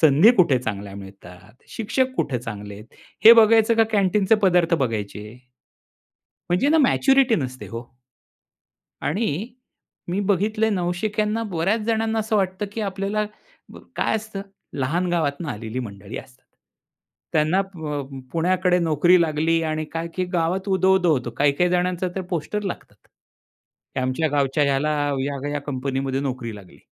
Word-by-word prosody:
संधी 155 - +6
कुठे 165 -9 +4
चांगल्या 100 -4 -5
मिळतात, 95 +2 -13
शिक्षक 260 +4 -1
कुठे 130 -4 -1
चांगले 105 -3 -7
आहेत, 105 +2 -11 0.4
हे 225 - +12
बघायचं 225 0 +5
का 225 - +5
कॅन्टीनचे 200 +1 +3
पदार्थ 175 -2 +3
बघायचे? 110 -3 -4 1.1
म्हणजे 180 +11 +2
ना, 320 +2 +4
मॅच्युरिटी 270 -2 +4
नसते 130 -3 -5
हो. 115 +1 -6 1.2
आणि 195 +2 -1 0.6
मी 185 +4 -1
बघितलंय 210 +3 +1
नवशिक्यांना 210 +4 -1
बऱ्याच 185 +6 0
जणांना 225 -1 0
असं 220 0 0
वाटतं, 190 0 -1
की 225 - -4
आपल्याला 200 +1 -2 0.5
ब - - -11 0.2
काय - - +1
असतं? 215 -2 -6 0.4
लहान 165 +8 0
गावातून 160 -1 -1
आलेली 110 0 -5
मंडळी 100 -2 -8
असतात. 130 -1 -14 0.9
त्यांना 155 +4 +2
अ, 195 - +3
प 150 -7 -6
पुण्याकडे 180 +2 +2
नोकरी 170 +2 +4
लागली 165 +1 +1
आणि 155 0 -2
काय 165 +1 -3
की 185 - -1
गावात 180 +3 0
उदो, 190 0 +3
उदो 180 -3 +3
होतो. 125 -4 -1
काही-काही 145 +5 +2
जणांच 180 0 0
तर 185 +1 -3
पोस्टर 190 +5 -2
लागतात. 195 - -8 0.9
आमच्या 130 +5 0
गावच्या 140 0 +1
ह्याला 140 +2 +1 0.3
ह्या-ह्या 145 +1 -3
कंपनीमध्ये 135 -1 -2
नोकरी 125 -5 -4
लागली. 95 -3 -15
165 Hz, 140 wpm, -23 LUFS, 135-195 Hz, 1.2 s, हे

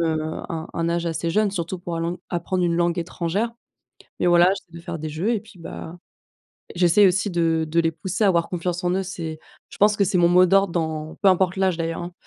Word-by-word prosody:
heu, 160 -2 0 0.3
un 160 -1 -5
un 165 0 -1
âge 170 0 -1
assez 165 0 -2
jeune, 210 +4 +2
surtout 180 -1 -4
pour 175 -1 -5
l'ang 170 +1 -2
apprendre 180 +1 -1
une 170 -1 +1
langue 175 0 +1
étrangère, 180 +6 -2 0.7
mais - - +3
voilà, 175 0 +6
j'essaie 170 -3 -11
de 170 - -10
faire 170 -2 -5
des 155 - -4
jeux 170 +10 -1
et 225 - 0
puis, 220 -3 -17
bah, 165 0 -8 0.8
j'essaie 175 +3 +5
aussi 195 +3 +2
de 165 -2 +1
de 165 +2 +2
les 165 - +1
pousser 190 +5 -3
à - - +5
avoir 170 -2 +2
confiance 180 0 -3
en 175 - +2
eux. 190 +1 0
C'est 165 -4 -6 0.3
je - - -12
pense 210 +1 +4
que 200 - +3
c'est 185 0 +1
mon 170 -1 +4
mot 180 +1 +6
d'ordre 195 0 +3
dans 160 -2 -3
peu 200 - +4
importe 185 0 +3
l'âge, 190 -2 +2
d'ailleurs, 165 -1 -3
hein, 175 +1 -7
175 Hz, 235 wpm, -23 LUFS, 165-190 Hz, 0.8 s, voilà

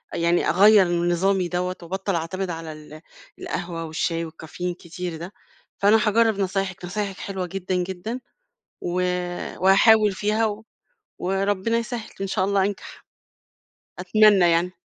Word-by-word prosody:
يعني 170 +1 +2
أغيَّر 205 +1 +6
من 175 0 0
نظامي 185 +1 +1
دوّة 180 +1 -2
وأبطَّل 190 +2 -3
أعتمد 180 +3 -3
على 165 -1 -5
ال 155 0 -12 0.4
القهوة 165 -1 -4
والشاي 165 +1 -2
والكافيين 165 +2 -6
كتير 175 -1 -7
ده. 175 +5 -8 0.4
فأنا 205 +2 +5
هاجرّب 220 -1 +3
نصايحِك، 195 -2 -2
نصايحِك 195 +1 -4
حلوة 190 -2 -4
جدًا، 185 0 -3
جدًا. 190 +7 -3 0.6
و 175 +1 -2 0.6
وهاحاول 205 +2 +5
فيها 215 +3 0
و 215 +1 -5 0.5
وربنا 195 +4 0
يسهّل 235 -1 -5
إن 195 - -1
شاء 190 0 0
الله 195 -1 +2
أنجَح، 200 -1 -6 0.9
أتمنى 205 -5 +5
يعني. 170 +2 +2
185 Hz, 135 wpm, -23 LUFS, 175-205 Hz, 0.9 s, أغيَّر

